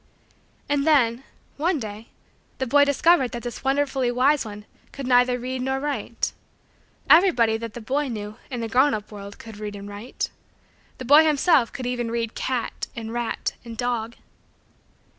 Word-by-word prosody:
And 290 Hz, +1 st, 0 dB
then, 255 Hz, -5 st, +3 dB, 0.3 s
one 325 Hz, +2 st, +1 dB
day, 215 Hz, 0 st, -7 dB, 0.5 s
the 260 Hz, -, -1 dB
boy 285 Hz, +3 st, +5 dB
discovered 285 Hz, -1 st, +3 dB
that 240 Hz, -, -5 dB
this 240 Hz, -2 st, -6 dB
wonderfully 270 Hz, -2 st, +1 dB
wise 265 Hz, +4 st, +3 dB
one 210 Hz, -1 st, -9 dB, 0.3 s
could 275 Hz, -, -7 dB
neither 250 Hz, 0 st, +4 dB
read 255 Hz, +1 st, -4 dB
nor 265 Hz, +1 st, -1 dB
write. 290 Hz, +1 st, -3 dB, 0.7 s
Everybody 305 Hz, -, +5 dB
that 230 Hz, -1 st, -7 dB
the 240 Hz, -, -6 dB
boy 275 Hz, +6 st, -1 dB
knew, 210 Hz, -3 st, -6 dB
in 245 Hz, -3 st, -4 dB
the 230 Hz, -, -2 dB
grown 260 Hz, +4 st, +3 dB
up 210 Hz, 0 st, -7 dB
world, 200 Hz, -1 st, -9 dB
could 225 Hz, -2 st, -11 dB
read 210 Hz, -1 st, -5 dB
and 200 Hz, 0 st, -8 dB
write. 205 Hz, +5 st, -5 dB, 0.7 s
The 255 Hz, -, -7 dB
boy 295 Hz, +5 st, +8 dB
himself 300 Hz, -4 st, +3 dB
could 265 Hz, -3 st, -6 dB
even 245 Hz, -1 st, -2 dB
read 230 Hz, -1 st, -2 dB
"cat" 250 Hz, -3 st, -3 dB
and 225 Hz, -1 st, -6 dB
"rat" 240 Hz, -1 st, -2 dB
and 230 Hz, -2 st, -9 dB
"dog." 235 Hz, -2 st, -2 dB
245 Hz, 165 wpm, -24 LUFS, 225-275 Hz, 0.7 s, boy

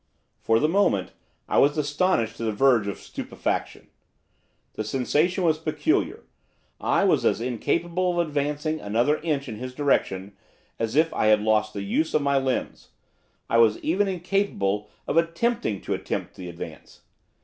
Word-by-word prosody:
For 115 Hz, -, +2 dB
the 150 Hz, -, +3 dB
moment, 165 Hz, -, +1 dB, 0.4 s
I -, -, +2 dB
was 145 Hz, +2 st, +4 dB
astonished 145 Hz, -6 st, +1 dB
to -, -, -5 dB
the 110 Hz, -, 0 dB
verge 115 Hz, -1 st, +3 dB
of 100 Hz, -, -3 dB
stupefaction. -, -, -4 dB, 0.8 s
The 110 Hz, -, -3 dB
sensation 150 Hz, -, 0 dB
was 160 Hz, -2 st, +2 dB
peculiar. 155 Hz, -1 st, 0 dB, 0.6 s
I -, -, +2 dB
was -, -, +3 dB
as -, -, +2 dB
incapable 170 Hz, -, -1 dB
of 170 Hz, -, +1 dB
advancing 150 Hz, +2 st, -1 dB
another 120 Hz, +8 st, +1 dB
inch 150 Hz, -4 st, -2 dB
in 110 Hz, -3 st, -6 dB
his 125 Hz, +2 st, -7 dB
direction 100 Hz, -9 st, 0 dB, 0.4 s
as 115 Hz, +1 st, -2 dB
if 160 Hz, +2 st, +3 dB
I -, -, +1 dB
had 105 Hz, -1 st, +5 dB
lost 110 Hz, 0 st, +1 dB
the 100 Hz, -, -3 dB
use 155 Hz, +11 st, 0 dB
of 150 Hz, -, +2 dB
my 140 Hz, -1 st, +3 dB
limbs, 130 Hz, -1 st, -3 dB, 0.6 s
I 115 Hz, -, +3 dB
was 110 Hz, -2 st, +5 dB
even 195 Hz, +6 st, +1 dB
incapable 175 Hz, -, -1 dB, 0.2 s
of 155 Hz, -, 0 dB
attempting 170 Hz, -, 0 dB
to -, -, -3 dB
attempt -, -, -4 dB
to 90 Hz, -2 st, -7 dB
advance. 85 Hz, -, -10 dB
140 Hz, 160 wpm, -25 LUFS, 110-160 Hz, 0.8 s, had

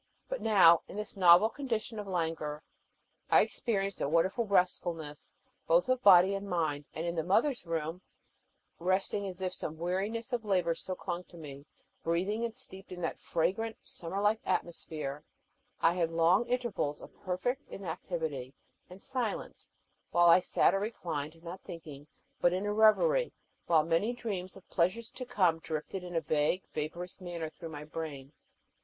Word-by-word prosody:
But -, -, -3 dB
now, 180 Hz, -6 st, +6 dB
in -, -, -10 dB
this 210 Hz, +1 st, -5 dB
novel 180 Hz, +2 st, +7 dB
condition 225 Hz, -4 st, -3 dB
of 205 Hz, -, -6 dB
languor, 160 Hz, -4 st, -2 dB, 0.7 s
I -, -, +7 dB
experienced 200 Hz, -4 st, -1 dB
a -, -, 0 dB
wonderful 190 Hz, +8 st, +2 dB
restfulness 170 Hz, -5 st, -1 dB, 0.3 s
both 170 Hz, +7 st, +4 dB
of 255 Hz, -1 st, +2 dB
body 190 Hz, -2 st, +7 dB
and 195 Hz, 0 st, -4 dB
mind, 155 Hz, -5 st, -1 dB
and 160 Hz, -, -3 dB
in 170 Hz, -, -1 dB
the 160 Hz, -2 st, -1 dB
Mother's 225 Hz, -, +1 dB
Room, 165 Hz, +2 st, -2 dB, 0.8 s
resting 190 Hz, +3 st, 0 dB
as 190 Hz, 0 st, -6 dB
if 185 Hz, -1 st, -1 dB
some 160 Hz, -3 st, -5 dB
weariness 205 Hz, -, -2 dB
of 240 Hz, -2 st, 0 dB
labor 180 Hz, -5 st, +2 dB
still 185 Hz, +2 st, -5 dB
clung 180 Hz, -1 st, -4 dB
to 175 Hz, -, -15 dB
me, 145 Hz, -2 st, -10 dB, 0.3 s
breathing 190 Hz, +7 st, 0 dB
and 230 Hz, -1 st, -3 dB
steeped 195 Hz, -8 st, -10 dB
in 180 Hz, -1 st, -7 dB
that -, -, -2 dB
fragrant, 195 Hz, +7 st, -1 dB
summer 175 Hz, +3 st, -3 dB
like 210 Hz, +2 st, +2 dB
atmosphere, 155 Hz, -5 st, -3 dB, 0.6 s
I 165 Hz, -, +5 dB
had 170 Hz, -2 st, 0 dB
long 170 Hz, +7 st, +3 dB
intervals 235 Hz, -12 st, -1 dB
of -, -, -12 dB
perfect 245 Hz, +9 st, -2 dB
inactivity 160 Hz, -7 st, -4 dB, 0.3 s
and 180 Hz, +1 st, -11 dB
silence, 240 Hz, -1 st, -3 dB, 0.4 s
while 175 Hz, 0 st, +5 dB
I 170 Hz, -, +8 dB
sat -, -, +3 dB
or 195 Hz, -, +1 dB
reclined, 165 Hz, -7 st, -4 dB
not 180 Hz, +2 st, -7 dB
thinking 150 Hz, -4 st, -10 dB, 0.3 s
but 175 Hz, -, +4 dB
in 185 Hz, +3 st, -1 dB
a 205 Hz, -, 0 dB
reverie, 485 Hz, -, +4 dB, 0.3 s
while 160 Hz, -2 st, +5 dB
many 170 Hz, +9 st, +1 dB
dreams 195 Hz, -7 st, -4 dB
of 195 Hz, -, -16 dB
pleasures 195 Hz, +7 st, 0 dB
to 255 Hz, -, -7 dB
come 180 Hz, -9 st, +2 dB
drifted 160 Hz, +4 st, -4 dB
in 175 Hz, -1 st, -7 dB
a 165 Hz, -, +2 dB
vague, 155 Hz, +4 st, +1 dB
vaporous 170 Hz, +5 st, -5 dB
manner 170 Hz, -3 st, -5 dB
through 165 Hz, +1 st, -9 dB
my 150 Hz, -2 st, -7 dB
brain. 150 Hz, -3 st, -6 dB
180 Hz, 165 wpm, -31 LUFS, 165-205 Hz, 0.8 s, I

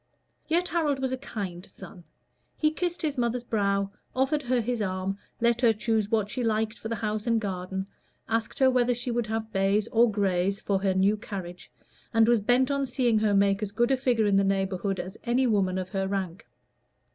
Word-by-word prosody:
Yet 345 Hz, +3 st, +1 dB
Harold 310 Hz, -5 st, +1 dB
was 265 Hz, -1 st, -2 dB
a 260 Hz, -, -1 dB
kind 190 Hz, -9 st, -6 dB
son: 180 Hz, -3 st, -12 dB, 0.5 s
he 305 Hz, -1 st, +2 dB
kissed 350 Hz, +2 st, -3 dB
his 290 Hz, -4 st, -1 dB
mother's 235 Hz, 0 st, 0 dB
brow, 200 Hz, -3 st, 0 dB, 0.2 s
offered 270 Hz, +3 st, +1 dB
her 255 Hz, -2 st, +1 dB
his 240 Hz, 0 st, -2 dB
arm, 190 Hz, 0 st, -2 dB, 0.2 s
let 235 Hz, +1 st, +2 dB
her 235 Hz, -3 st, +5 dB
choose 215 Hz, -1 st, 0 dB
what 215 Hz, -2 st, 0 dB
she 255 Hz, -, -2 dB
liked 220 Hz, 0 st, 0 dB
for -, -, -6 dB
the 230 Hz, -, -2 dB
house 215 Hz, 0 st, -3 dB
and 230 Hz, -1 st, +3 dB
garden, 190 Hz, -2 st, -4 dB, 0.4 s
asked 225 Hz, -1 st, -2 dB
her 265 Hz, -1 st, +5 dB
whether 250 Hz, -1 st, +2 dB
she 240 Hz, +1 st, -3 dB
would 235 Hz, -2 st, -1 dB
have 220 Hz, 0 st, -3 dB
bays 195 Hz, +2 st, +2 dB
or 235 Hz, +1 st, +4 dB
grays 195 Hz, -2 st, 0 dB
for 195 Hz, -1 st, -1 dB
her 190 Hz, -1 st, +1 dB
new 195 Hz, +3 st, +3 dB
carriage, 180 Hz, -, -8 dB, 0.4 s
and 225 Hz, 0 st, +5 dB
was 235 Hz, -2 st, +4 dB
bent 250 Hz, +5 st, +2 dB
on 280 Hz, -1 st, 0 dB
seeing 245 Hz, -3 st, +2 dB
her 210 Hz, -2 st, +2 dB
make 200 Hz, 0 st, +3 dB
as 210 Hz, -2 st, -3 dB
good 240 Hz, +5 st, +1 dB
a -, -, +5 dB
figure 250 Hz, -4 st, +1 dB
in 200 Hz, -1 st, +3 dB
the 195 Hz, -, +4 dB
neighborhood 195 Hz, -1 st, -1 dB
as 185 Hz, +3 st, -6 dB
any 250 Hz, +2 st, +2 dB
other 240 Hz, -, +2 dB
woman 190 Hz, -2 st, +1 dB
of 185 Hz, -1 st, -4 dB
her 195 Hz, -1 st, -1 dB
rank. 190 Hz, 0 st, -4 dB
220 Hz, 210 wpm, -27 LUFS, 195-245 Hz, 0.5 s, her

